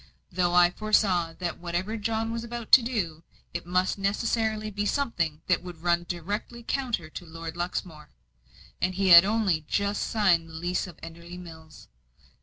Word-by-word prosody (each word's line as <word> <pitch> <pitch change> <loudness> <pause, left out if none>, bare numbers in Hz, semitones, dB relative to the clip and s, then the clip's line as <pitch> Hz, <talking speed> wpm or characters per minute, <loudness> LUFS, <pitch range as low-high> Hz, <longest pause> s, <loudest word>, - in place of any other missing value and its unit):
Though 175 -1 +1
I 175 0 +6
foresaw 185 -5 +1
that 175 0 -4
whatever 175 +5 -3
John 225 +1 -2
was 230 0 -3
about 235 -1 -7
to 265 - +10
do, 200 -10 -3 0.3
it 170 0 -5
must 185 +2 +1
necessarily 215 +1 0
be 205 +1 -2
something 175 - -1
that 180 - +2
would 175 -2 -10
run 175 0 +1
directly 205 +7 -4
counter 240 - -2
to - - -7
Lord 165 -1 -8
Luxmore 175 -3 -4 0.7
and 185 +1 0
he 195 0 +1
had 170 0 +10
only 200 -7 +1
just 200 0 0
signed 180 -7 +2
the - - -13
lease 175 +3 -2
of 175 - -12
Enderley 170 +2 -9
Mills. 160 -3 -12
180 Hz, 165 wpm, -27 LUFS, 170-215 Hz, 0.7 s, to